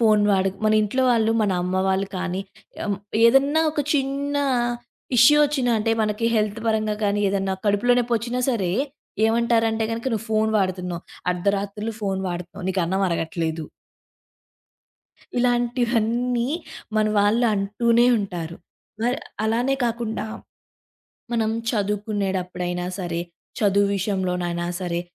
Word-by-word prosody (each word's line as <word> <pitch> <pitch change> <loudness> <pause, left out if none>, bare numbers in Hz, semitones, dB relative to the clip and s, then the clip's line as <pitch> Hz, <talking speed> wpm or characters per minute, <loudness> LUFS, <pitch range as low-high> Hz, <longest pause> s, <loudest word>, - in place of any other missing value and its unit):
Phone 215 -2 +4
వాడకు. 190 0 +1
మన 215 - +4
ఇంట్లో 255 +6 0
వాళ్ళు 225 -1 +2
మన 205 - +1
అమ్మ 185 +1 -1
వాళ్ళు 190 +1 0
కానీ, 185 +1 -2 0.5
ఆహ్, 200 -1 -1 0.3
ఏదన్నా 280 +6 +4
ఒక 295 - -1
చిన్నా 280 +1 0 0.7
ఇష్యూ 295 +6 +7
వచ్చినా 270 -4 0
అంటే 225 +2 0
మనకి 210 +2 0
హెల్త్ 215 +1 0
పరంగా 215 -1 0
కానీ, 205 0 +1
ఏదన్నా 195 -1 0
కడుపులోనొప్పి 240 +4 +2
వచ్చినా 240 +3 -3
సరే, 190 -8 0 0.5
ఏమంటారంటే 225 -1 +2
గనక, 230 +3 -4
నువ్వు 225 +1 -4
ఫోను 220 0 +2
వాడుతున్నావు, 180 -2 -2 0.3
అర్ధరాత్రులు 200 +4 -2
ఫోను 195 -1 -1
వాాడుతున్నావు 180 +2 -6
నీకన్నం 190 +1 0
అరగట్లేదు. 165 -1 -2 1.7
ఇలాంటివన్నీ 240 0 +1 0.5
మన 215 0 +3
వాళ్ళు 215 +4 +3
అంటూనే 230 +4 +2
ఉంటారు. 175 -5 -5 0.5
మరి 245 +2 +1 0.3
అలానే 240 +5 +1
కాకుండా, 230 -2 -2 1.1
మనం 225 -2 +1 0.2
చదువుకునేడప్పుడైనా 195 -4 -2
సరే, 170 -2 -2 0.4
చదువు 200 -1 +3
విషయంలోనైనా 180 -3 -1
సరే, 175 -1 -2
210 Hz, 115 wpm, -23 LUFS, 190-235 Hz, 1.7 s, ఇష్యూ